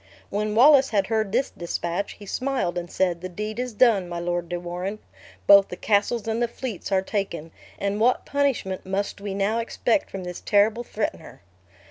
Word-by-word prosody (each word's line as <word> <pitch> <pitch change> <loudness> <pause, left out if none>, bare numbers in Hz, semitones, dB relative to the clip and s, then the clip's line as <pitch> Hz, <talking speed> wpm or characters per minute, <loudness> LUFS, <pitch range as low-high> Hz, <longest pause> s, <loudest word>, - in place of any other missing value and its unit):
When 210 +1 -1
Wallace 270 +2 +7
had 200 -4 +1
heard 220 -1 0
this 250 +5 +1
dispatch, 175 +2 -3
he 205 - -13
smile 255 -4 -1
and 175 -1 -4
said, 175 -3 0
"The 185 - -5
deed 210 +5 -5
is 250 0 -2
done, 210 -5 +3
my 175 - -4
Lord 175 0 -2
de 175 - -2
Warenne. 180 +4 -4 0.5
Both 200 -1 +8
the - - -6
castles 210 +3 +1
and 225 +1 -1
the 240 - +2
fleets 235 -5 -6
are 190 -1 +2
taken; 190 -6 -3 0.3
and 200 +1 -2
what 245 +3 +2
punishment 275 -10 -1
must 195 +1 -3
we 200 -1 -4
now 205 +3 +1
expect 230 +4 0
from 195 -1 -6
this 180 -1 -6
terrible 215 +3 +3
threatener?" 205 - -5
200 Hz, 185 wpm, -24 LUFS, 180-230 Hz, 0.5 s, Both